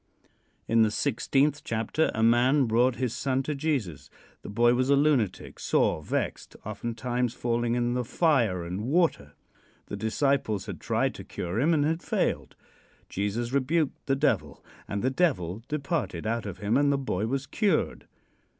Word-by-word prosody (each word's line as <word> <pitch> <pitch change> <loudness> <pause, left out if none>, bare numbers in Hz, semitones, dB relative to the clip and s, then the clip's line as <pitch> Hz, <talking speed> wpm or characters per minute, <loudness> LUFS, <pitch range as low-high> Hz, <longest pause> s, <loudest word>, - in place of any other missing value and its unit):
In 115 0 +3
the 110 - +4
sixteenth 140 +5 +1
chapter 115 +8 0
a 110 - +1
man 125 +5 +4
brought 120 +2 +2
his 125 -1 -2
son 135 -1 -1
to 150 - -2
Jesus. 130 - -2 0.3
The - - -9
boy 120 +3 +3
was 130 +2 +1
a 140 - +6
lunatic, 140 -9 +1
sore - - +1
vexed, - - -3
oftentimes 120 +3 -2
falling 120 -1 0
in 120 0 0
the 125 0 -1
fire 120 - +1
and 90 +4 -4
water. 130 - +1 0.6
The - - -4
disciples 110 -3 0
had - - -7
tried - - 0
to - - -9
cure 90 +5 -4
him 150 +7 +3
and 150 -3 +3
had 165 +2 0
failed. - - -1 0.5
Jesus 110 +5 -2
rebuked 140 +3 0
the 135 - +2
devil, 145 +2 -1 0.2
and 100 +1 -3
the 130 - +2
devil 115 - 0
departed 140 - -2
out 115 -1 -1
of 95 - -6
him 105 +4 +1
and 145 0 +3
the 140 - +2
boy 110 -6 -2
was 135 +3 -2
cured. 200 0 0
125 Hz, 165 wpm, -27 LUFS, 110-140 Hz, 0.6 s, a